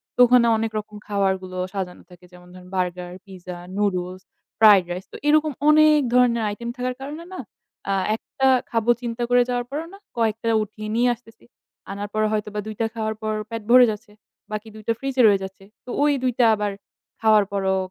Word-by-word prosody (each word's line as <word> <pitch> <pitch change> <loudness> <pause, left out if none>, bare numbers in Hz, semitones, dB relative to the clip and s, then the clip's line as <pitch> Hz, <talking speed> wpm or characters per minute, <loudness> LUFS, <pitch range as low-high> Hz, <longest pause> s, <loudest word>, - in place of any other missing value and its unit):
তো - - -15
ওখানে 245 -1 +5
অনেক 225 0 -2
রকম 210 0 -10
খাবারগুলো 190 -2 -1 0.2
সাজানো 185 -3 -5
থাকে। 180 0 -16
যেমন 180 0 -16
ধরেন 180 0 -13
burger, 180 -1 -2
pizza, 185 -2 -9 0.2
noodles, 185 -2 -1 0.4
fried 205 -4 +7
rice 180 +2 -6
তো - - -6
এরকম 305 0 +4 0.2
অনেক 305 0 +6
ধরনের 240 -2 +3
item 235 +2 -6
থাকার 250 0 -2
কারণে 295 +5 -7
না - - -7 0.5
আ - - +2 0.2
একটা 265 +3 -2 0.2
খাবো 230 0 +2
চিন্তা 240 0 -3
করে 245 0 +5
যাওয়ার 245 0 -1
পরও 305 +3 -3
না - - -11 0.2
কয়েকটা 225 0 0 0.2
উঠিয়ে 215 +1 -8
নিয়ে 245 +1 +3
আসতেছি। 225 -1 -21 0.5
আনার 200 +1 -5
পর 215 - 0
হয়তোবা 210 -1 -2
২ 215 - -6
টা - - +2
খাওয়ার 220 -1 -2
পর 215 0 -2 0.2
পেট 230 -1 -5
ভরে 250 +1 +8
যাচ্ছে 210 0 -9 0.4
বাকি 215 +1 -5
২ 215 - -11
টা - - +3
fridge 270 -1 -4
এ - - +5
রয়ে 200 -2 +4
যাচ্ছে। 190 0 -9 0.2
তো - - -11
ওই 295 0 +4
২ 255 - +2
টা 240 - +6
আবার 205 -1 -2 0.5
খাওয়ার 215 -2 +5
পরও 190 -1 0
215 Hz, 195 wpm, -23 LUFS, 195-245 Hz, 0.5 s, ভরে